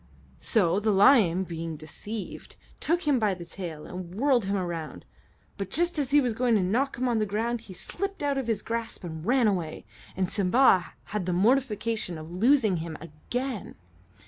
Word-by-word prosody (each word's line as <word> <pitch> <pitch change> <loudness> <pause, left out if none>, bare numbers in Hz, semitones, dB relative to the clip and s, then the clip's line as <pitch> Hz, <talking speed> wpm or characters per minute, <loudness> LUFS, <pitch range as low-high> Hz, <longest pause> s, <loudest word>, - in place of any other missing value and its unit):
So 190 -5 +2
the 215 +1 0
lion, 195 -3 +5
being 165 -2 -5
deceived, 200 +8 -8 0.2
took 340 +2 +1
him 285 -4 +2
by 210 -4 +1
the 175 -1 -9
tail 170 -4 -7
and 180 0 -7
whirled 250 -2 +2
him 200 +1 0
around, 170 -6 -4 0.5
but 195 -1 -4
just 345 - +1
as 275 -3 -1
he 290 +1 +5
was 250 -5 +1
going 240 0 +2
to 200 - +3
knock 245 +9 0
him 255 +1 0
on 235 -2 +1
the 215 - +1
ground 225 +3 -1
he 205 -4 -11
slipped 395 - -5
out 280 -1 +1
of 260 - -4
his 220 -3 -1
grasp 230 -2 -4
and 160 -2 -6
ran 245 +4 +3
away, 175 -6 -2 0.3
and 185 -1 0
Simba 195 0 +3
had 205 -4 -4
the 180 - +1
mortification 220 -3 +1
of 155 +1 -9
losing 220 0 +3
him 160 -1 -5
again. 210 - -5
210 Hz, 185 wpm, -27 LUFS, 180-245 Hz, 0.5 s, lion